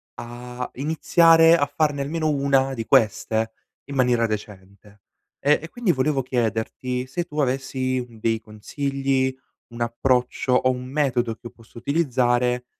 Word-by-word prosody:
a 125 +1 -7
iniziare 165 +3 +5
a 145 - +2
farne 145 -2 +1
almeno 155 +2 -1
una 135 -2 +2
di 115 -3 -4
queste 110 -2 +2 0.3
in 140 - -7
maniera 125 -3 +3
decente 100 -1 -8 0.4
e 145 +2 +3
e 165 - -8
quindi 240 -6 0
volevo 135 -1 0
chiederti 125 +1 -2
se 175 +7 -3
tu 150 -3 -6
avessi 130 -1 -1
dei 115 0 0
consigli, 135 +4 -2 0.3
un 120 0 -10
approccio 125 +2 0
o 130 +1 +3
un 125 0 -5
metodo 130 -4 0
che 120 +1 -11
posso 115 0 -19
utilizzare, 125 -3 +1
130 Hz, 135 wpm, -23 LUFS, 120-140 Hz, 0.4 s, iniziare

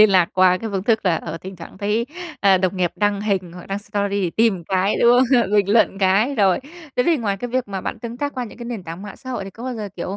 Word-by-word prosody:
liên 215 -1 +8
lạc 185 -3 +4
qua 185 -1 +4
cái 225 -2 -5
phương 190 -2 -2
thức 220 0 +2
là, 175 -3 +3
ờ, 165 +1 -6
thỉnh 190 +2 -9
thoảng 170 +3 -11
thấy, 215 +4 0 0.3
ờ, 195 -2 +5
đồng 185 0 0
nghiệp 175 -2 +1
đăng 205 -1 +1
hình 190 -5 -1
hoặc 180 -1 -11
đăng 195 +1 -3
story 200 -1 -2
thì 175 - 0
tim 205 -6 +1
cái, 190 +2 +1
đúng 235 - +7
không, 245 -5 +3
bình 200 -2 +3
luận 220 -3 +3
cái. 200 +8 +3
Rồi, 195 -5 +3 0.4
thế 250 - +4
thì 335 +2 +3
ngoài 205 -6 -1
cái 245 +4 -5
việc 255 -3 -1
mà 195 -1 -4
bạn - - -5
tương 235 0 -7
tác 285 +2 -3
qua 250 - -3
những 225 +1 -12
cái 240 - -7
nền 235 -5 -5
tảng 170 +3 -8
mạng 205 - -9
xã 260 -1 -9
hội 220 -6 -3
thì 195 - -8
có 230 - -12
bao 255 -1 -3
giờ, 215 -2 -5
kiểu, 185 +3 -4
200 Hz, 295 wpm, -21 LUFS, 185-230 Hz, 0.4 s, liên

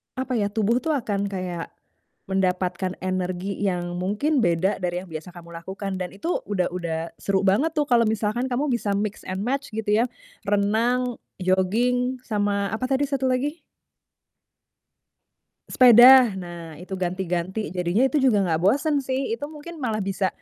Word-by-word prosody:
apa 260 -1 -2
ya, 205 - +1
tubuh 225 +3 +1
tuh 315 +2 -1
akan 205 -6 -1
kayak 185 -3 -4 0.6
mendapatkan 185 -1 0
energi 185 +1 -2
yang 175 -3 -1
mungkin 235 +11 +1
beda 175 +3 +1
dari 175 0 -1
yang 190 - -14
biasa 160 +3 -7
kamu 170 -1 -12
lakukan, 190 +2 -5
dan 180 - -3
itu 265 - -2
udah 185 -3 +1
udah 170 -3 -3 0.2
seru 195 -1 +1
banget 215 +12 +3
tuh 295 - +3
kalau 240 -2 +5
misalkan 220 +3 -1
kamu 255 +4 0
bisa 230 -3 -1
mix 210 0 -3
and 190 +1 -3
match, 275 +3 -2
gitu 215 0 +2
ya, - - +1 0.4
renang, 230 +5 +1 0.2
joging, 235 +8 +1
sama 205 -2 0
apa 225 +4 -2
tadi 270 +1 +2
1 270 -2 -1
lagi? 290 +6 -1 2.1
Sepeda, 245 -2 +8
nah 170 -3 -8
itu 180 +5 -13
ganti-ganti. 185 +2 -2
Jadinya 180 +5 +1
itu 280 +3 +2
juga 240 -7 +3
nggak 165 -3 0
bosen 285 - +2
sih, 265 +5 -2
itu 370 -11 -3
mungkin 310 +2 -10
malah 220 -6 -1
bisa 195 0 0
205 Hz, 155 wpm, -24 LUFS, 185-250 Hz, 2.1 s, Sepeda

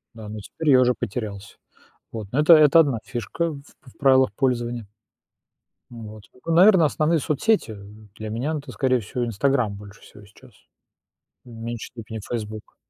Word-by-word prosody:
Да, 110 -2 -9
но 105 0 -6
теперь 155 +9 -4
я 130 -2 +7
уже 125 0 +3
потерялся. 100 -3 -6 0.6
Вот, 110 -3 -7
но 140 - +2
это 155 +3 +7
это 155 +1 +6
1 140 -7 +1
фишка 130 +7 -3
в 145 -3 -8 0.3
в 125 - -18
правилах 130 -4 +4
пользования. 120 -2 -1 1.0
Вот. 110 -3 -10 0.2
Ну, 165 - 0
наверное, 185 0 +6
основные 155 +3 +1
соцсети, 150 - 0 0.4
для 110 0 -7
меня 125 +8 -2
это, 145 -2 -9
скорее 130 -1 +1
всего, 120 +3 -4
"Инстаграм" 120 0 0
больше 100 0 -13
всего 105 - -16
сейчас, 100 - -19 0.9
в - - -17
меньшей 115 0 -6
степени 110 -2 -8
"Фейсбук". 110 -2 -6
120 Hz, 160 wpm, -23 LUFS, 110-145 Hz, 1.0 s, я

